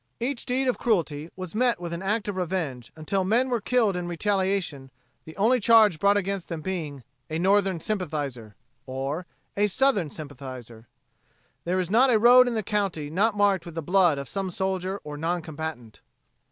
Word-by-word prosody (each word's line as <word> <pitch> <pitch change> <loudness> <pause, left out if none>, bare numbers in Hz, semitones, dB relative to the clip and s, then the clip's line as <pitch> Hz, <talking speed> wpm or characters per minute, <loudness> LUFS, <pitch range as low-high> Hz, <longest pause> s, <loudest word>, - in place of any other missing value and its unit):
Each 250 +1 -3
deed 260 +2 0
of 250 - 0
cruelty 165 -9 0
was 185 -2 -7
met 240 -2 +1
with 170 -1 -5
an 170 - -4
act 210 +3 -1
of 205 - -3
revenge, 165 -9 -3
until 175 +5 -1
men 235 +7 +2
were 240 -3 0
killed 220 -4 +2
in 175 -1 -3
retaliation, 185 -6 -1 0.4
the 160 - -12
only 235 +6 +3
charge 215 -6 +5
brought 200 +2 +4
against 195 -2 -3
them 165 -3 -4
being, 155 -7 -4 0.3
"a 160 - -2
Northern 190 0 +2
sympathizer," 145 - -4 0.3
or 135 +7 -4 0.3
"a 205 +1 +2
Southern 210 - +2
sympathizer." 130 -6 -9 0.8
There 180 +2 0
is 185 -1 -1
not 250 +5 +5
a 235 - +5
road 245 +3 +7
in 240 - -1
the 220 - -1
county 195 -8 -2
not 205 +5 +1
marked 200 -3 +3
with 170 -2 -10
the 165 - -3
blood 175 -2 +3
of 140 - -5
some 195 -1 -3
soldier 190 +1 -2
or 150 -1 -7
non 170 +2 -1
combatant. 155 -8 -7
185 Hz, 180 wpm, -26 LUFS, 155-210 Hz, 0.8 s, road